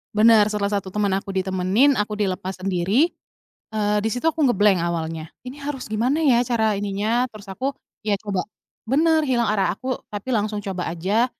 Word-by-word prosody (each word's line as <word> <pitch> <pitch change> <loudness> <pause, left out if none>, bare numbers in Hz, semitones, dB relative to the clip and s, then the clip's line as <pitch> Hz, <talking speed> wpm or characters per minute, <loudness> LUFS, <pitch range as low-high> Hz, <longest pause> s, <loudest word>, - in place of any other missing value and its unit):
Benar. 215 -1 +6
Setelah 205 -1 -1
satu 190 -1 -10
teman 205 0 0
aku 195 0 -4
ditemenin, 190 +8 +2
aku 210 -1 -2
dilepas 190 -1 -2
sendiri, 195 - +1 0.6
eee, 210 -1 +1
di 215 +2 0
situ 250 +9 +1
aku 310 -2 +1
nge-blank 205 -5 +4
awalnya, 165 -2 -3 0.2
"Ini 255 +3 -9
harus 270 -6 -5
gimana 250 +9 +1
ya 265 -6 +5
cara 220 -4 +1
ininya?" 210 +5 0
Terus 215 -5 -12
aku, 265 +8 -3 0.3
"Iya 210 - +3
coba" 200 -4 -2 0.4
bener, 315 +2 +3
hilang 240 -4 +1
arah 205 -2 +1
aku, 255 0 -3
tapi 205 +4 -6
langsung 210 -3 0
coba 190 -2 -4
aja 190 +8 +1
210 Hz, 175 wpm, -23 LUFS, 195-245 Hz, 0.6 s, Benar